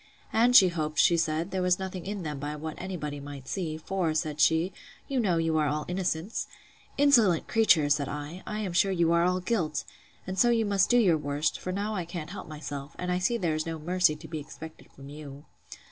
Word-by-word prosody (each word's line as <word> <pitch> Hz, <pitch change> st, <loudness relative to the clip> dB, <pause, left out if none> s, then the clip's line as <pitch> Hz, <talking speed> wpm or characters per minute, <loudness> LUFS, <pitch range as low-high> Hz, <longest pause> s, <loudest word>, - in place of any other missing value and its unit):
And 240 Hz, +2 st, +4 dB
she 190 Hz, -6 st, +9 dB
hoped, 155 Hz, -3 st, -3 dB
she 170 Hz, -, +5 dB
said, 165 Hz, +2 st, -1 dB
there 190 Hz, -, -1 dB
was 180 Hz, 0 st, +3 dB
nothing 190 Hz, -1 st, -6 dB
in 200 Hz, -2 st, -4 dB
them 150 Hz, -3 st, -4 dB
by 145 Hz, +2 st, -4 dB
what 155 Hz, +1 st, -5 dB
any 185 Hz, 0 st, -5 dB
body 150 Hz, -2 st, -5 dB
might 140 Hz, -2 st, -9 dB
see; 165 Hz, -5 st, -3 dB
for, 165 Hz, -1 st, -2 dB
said 155 Hz, -1 st, -2 dB
she, 160 Hz, +5 st, +3 dB, 0.3 s
you 270 Hz, -2 st, -1 dB
know 190 Hz, -7 st, +2 dB
you 165 Hz, -1 st, +1 dB
are 150 Hz, -, +2 dB
all 150 Hz, +1 st, -2 dB
innocence!—Insolent 190 Hz, -, 0 dB
creature! 215 Hz, -10 st, +4 dB
said 145 Hz, -1 st, +1 dB
I, 150 Hz, +5 st, -6 dB
I 215 Hz, 0 st, -3 dB
am 190 Hz, -4 st, -3 dB
sure 195 Hz, +2 st, +3 dB
you 170 Hz, -3 st, +2 dB
are 170 Hz, 0 st, +4 dB
all 180 Hz, +1 st, +1 dB
guilt!—And 185 Hz, -1 st, -4 dB
so 240 Hz, -, +5 dB
you 230 Hz, -2 st, +2 dB
must 200 Hz, -2 st, +2 dB
do 245 Hz, -, +5 dB
your 180 Hz, -9 st, +4 dB
worst; 145 Hz, +1 st, -1 dB
for 185 Hz, -, -4 dB
now 205 Hz, +3 st, -2 dB
I 180 Hz, -5 st, -3 dB
can't 170 Hz, -1 st, -6 dB
help 200 Hz, -, -8 dB
myself, 145 Hz, -2 st, -7 dB
and 180 Hz, 0 st, -3 dB
I 180 Hz, -, +1 dB
see 235 Hz, +6 st, +1 dB
there 170 Hz, -7 st, 0 dB
is 155 Hz, +1 st, -2 dB
no 165 Hz, 0 st, -3 dB
mercy 175 Hz, 0 st, +2 dB
to 150 Hz, -, -11 dB
be 160 Hz, -, -5 dB
expected 160 Hz, +2 st, -11 dB
from 135 Hz, 0 st, -13 dB
you. 145 Hz, -1 st, -10 dB
170 Hz, 220 wpm, -28 LUFS, 155-190 Hz, 0.3 s, she